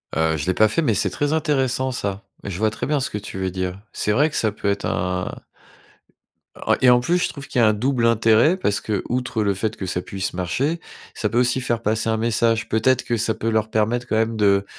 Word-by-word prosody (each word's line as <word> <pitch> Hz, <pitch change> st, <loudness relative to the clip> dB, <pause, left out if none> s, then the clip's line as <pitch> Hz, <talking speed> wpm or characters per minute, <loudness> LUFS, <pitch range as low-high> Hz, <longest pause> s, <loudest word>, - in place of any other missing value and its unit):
Heu, 80 Hz, 0 st, +2 dB
je 70 Hz, -, -3 dB
l'ai 95 Hz, -, +1 dB
pas 110 Hz, +3 st, +4 dB
fait, 140 Hz, +10 st, 0 dB
mais 115 Hz, -8 st, +2 dB
c'est -, -, 0 dB
très 145 Hz, 0 st, -1 dB
intéressant 135 Hz, -4 st, 0 dB
ça. 100 Hz, -2 st, -3 dB, 0.2 s
Je 100 Hz, -3 st, -5 dB
vois 110 Hz, +2 st, +2 dB
très 110 Hz, -, -5 dB
bien 150 Hz, -1 st, +1 dB
ce 135 Hz, -, -2 dB
que 105 Hz, -, -4 dB
tu 100 Hz, -2 st, -8 dB
veux 95 Hz, 0 st, -1 dB
dire. 95 Hz, +1 st, -3 dB
C'est 105 Hz, -, -1 dB
vrai 145 Hz, +8 st, +3 dB
que -, -, -8 dB
ça 110 Hz, -, +1 dB
peut 100 Hz, 0 st, -3 dB
être 100 Hz, +1 st, -1 dB
un 90 Hz, -4 st, -2 dB, 1.3 s
En -, -, +5 dB
et 130 Hz, -, +6 dB
en 125 Hz, 0 st, +6 dB
plus 170 Hz, +8 st, +1 dB
je -, -, 0 dB
trouve 140 Hz, -1 st, -9 dB
qu'il -, -, -1 dB
y -, -, +5 dB
a 110 Hz, -, +6 dB
un 110 Hz, -, +4 dB
double 120 Hz, +2 st, 0 dB
intérêt 115 Hz, -, +4 dB
parce 105 Hz, -, 0 dB
qu'outre 115 Hz, +2 st, -2 dB
le 100 Hz, -1 st, +1 dB
fait 110 Hz, +3 st, -3 dB
que 95 Hz, -, -4 dB
ça 90 Hz, 0 st, -2 dB
puisse 95 Hz, 0 st, -4 dB
marcher, 130 Hz, -, -1 dB, 0.3 s
ça 105 Hz, -, -2 dB
peut 120 Hz, -, +1 dB
aussi 125 Hz, +1 st, +2 dB
faire 120 Hz, -2 st, -1 dB
passer 110 Hz, +1 st, 0 dB
un 110 Hz, -, +1 dB
message. 115 Hz, 0 st, +1 dB
Peut-être 125 Hz, +3 st, +2 dB
que 120 Hz, -, 0 dB
ça 115 Hz, 0 st, 0 dB
peut 110 Hz, +1 st, -5 dB
leur 110 Hz, -1 st, 0 dB
permettre 115 Hz, +3 st, 0 dB
quand 110 Hz, -, 0 dB
même 115 Hz, 0 st, +1 dB
de 100 Hz, -2 st, +3 dB
110 Hz, 250 wpm, -22 LUFS, 100-125 Hz, 1.3 s, et